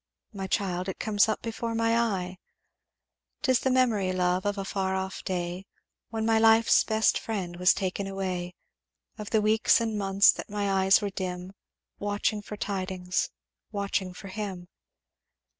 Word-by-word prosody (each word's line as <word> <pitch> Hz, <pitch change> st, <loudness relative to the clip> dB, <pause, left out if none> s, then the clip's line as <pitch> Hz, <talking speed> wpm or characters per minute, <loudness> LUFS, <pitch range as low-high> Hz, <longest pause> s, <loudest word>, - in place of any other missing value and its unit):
'My 195 Hz, -2 st, -4 dB
child, 185 Hz, -2 st, -1 dB
it 190 Hz, -, -5 dB
comes 215 Hz, 0 st, +2 dB
up 215 Hz, -, -2 dB
before 230 Hz, 0 st, -3 dB
my 230 Hz, 0 st, +2 dB
eye. 190 Hz, -6 st, -1 dB, 1.0 s
"'Tis 260 Hz, -4 st, +3 dB
the 265 Hz, -, 0 dB
memory, 235 Hz, -7 st, +2 dB
love, 180 Hz, +1 st, 0 dB
of 205 Hz, 0 st, -1 dB
a 195 Hz, -, -3 dB
far 190 Hz, -1 st, -1 dB
off 190 Hz, 0 st, -4 dB
day 180 Hz, +1 st, -3 dB, 0.4 s
When 220 Hz, -1 st, -2 dB
my 225 Hz, 0 st, +3 dB
life's 225 Hz, 0 st, +5 dB
best 220 Hz, 0 st, +2 dB
friend 185 Hz, -6 st, -4 dB
was 180 Hz, +2 st, +5 dB
taken 195 Hz, 0 st, -2 dB
away; 185 Hz, -2 st, -4 dB, 0.6 s
Of 210 Hz, -1 st, -6 dB
the 220 Hz, -2 st, +2 dB
weeks 220 Hz, +1 st, +4 dB
and 225 Hz, -2 st, -2 dB
months 195 Hz, 0 st, +5 dB
that -, -, -8 dB
my 205 Hz, -1 st, -1 dB
eyes 195 Hz, +2 st, +5 dB
were 200 Hz, -, -2 dB
dim 185 Hz, 0 st, -5 dB, 0.5 s
Watching 205 Hz, +1 st, -1 dB
for 210 Hz, 0 st, -8 dB
tidings 185 Hz, -3 st, -2 dB, 0.4 s
watching 200 Hz, -2 st, -2 dB
for 195 Hz, +2 st, -10 dB
him. 190 Hz, -3 st, -6 dB
200 Hz, 160 wpm, -27 LUFS, 185-220 Hz, 1.0 s, life's